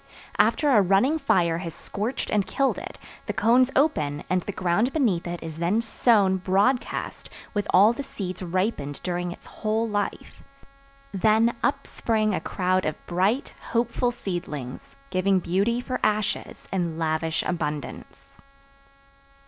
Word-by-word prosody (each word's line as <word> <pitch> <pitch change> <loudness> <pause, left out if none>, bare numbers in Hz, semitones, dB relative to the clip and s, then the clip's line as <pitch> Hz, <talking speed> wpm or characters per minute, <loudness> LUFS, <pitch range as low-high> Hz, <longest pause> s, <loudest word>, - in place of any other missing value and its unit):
After 295 -2 +3
a 215 -5 +6
running 200 - +3
fire 170 - +2
has 170 -3 -6
scorched 220 +6 -4
and 205 -2 +1
killed 275 -1 +1
it - - -8 0.3
the - - -1
cones 245 +3 +4
open 150 - +1
and 185 0 +2
the 205 - -5
ground 190 +7 +1
beneath 205 - +1
it 175 0 -5
is 160 -1 -7
then 175 +6 +2
sown 210 -4 +3
broadcast 200 +8 0 0.2
with 205 -2 -1
all 205 +5 +6
the 260 - -5
seeds 195 -10 -6
ripened 180 -6 -2
during 175 -1 -2
its - - -11
whole 220 +1 -1
life. 205 -2 -3 0.7
Then 220 +4 +3
up - - 0
spring 215 -2 0
a - - -1
crowd 185 0 0
of 155 - -1
bright, 195 +10 0
hopeful 240 +1 0
seedlings, 175 - -6 0.2
giving 185 +1 +2
beauty 195 +7 +1
for 255 +1 -3
ashes 215 -1 -1
in 170 -4 -1
lavish 160 0 0
abundance. 150 -4 -5
195 Hz, 140 wpm, -25 LUFS, 175-230 Hz, 0.7 s, a